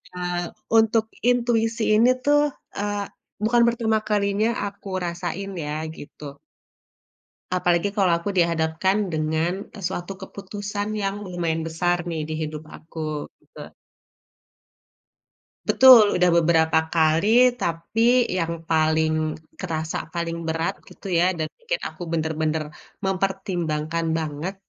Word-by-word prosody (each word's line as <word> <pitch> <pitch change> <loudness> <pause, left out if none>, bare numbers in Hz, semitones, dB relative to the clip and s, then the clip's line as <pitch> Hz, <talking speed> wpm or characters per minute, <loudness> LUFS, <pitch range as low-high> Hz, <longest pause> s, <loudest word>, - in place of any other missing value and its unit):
eee, 180 -1 -2 0.4
untuk 225 0 +3 0.2
intuisi 235 -2 +1
ini 230 +3 +5
tuh, 290 0 +4 0.4
eee, 205 0 -2 0.4
bukan 235 +2 +3
pertama 230 -2 +1
kalinya 205 +1 +1 0.2
aku 200 0 -11 0.2
rasain 175 +3 -4
ya 150 0 -3 0.2
gitu. 145 -1 -10 1.2
Apalagi 175 +1 +2
kalau 190 -4 +3
aku 170 - -5
dihadapkan 170 +4 +1
dengan 160 +1 0 0.3
suatu 190 +1 -5
keputusan 205 +2 -5
yang 205 -1 -3
lumayan 170 -3 -2
besar 170 +2 0
nih 165 -2 -3
di 155 - -3
hidup 155 0 -7
aku, 155 -2 -6 0.2
gitu. - - -12 1.9
Betul, 245 -6 +8
udah 180 0 +4
beberapa 160 -1 +3
kali 160 +3 +3 0.3
tapi 170 +6 -2 0.4
yang 165 -1 -1 0.2
paling 160 0 +2 0.5
kerasa, 160 -3 -3 0.2
paling 170 -1 -2
berat 165 +1 -1
gitu - - -13
ya 170 - +4
dan 155 -1 -1
pikir 480 +1 -2
aku - - -11
bener-bener 160 -1 -1 0.4
mempertimbangkan 175 -4 -1
banget 160 +4 -4
175 Hz, 110 wpm, -23 LUFS, 160-205 Hz, 1.9 s, Betul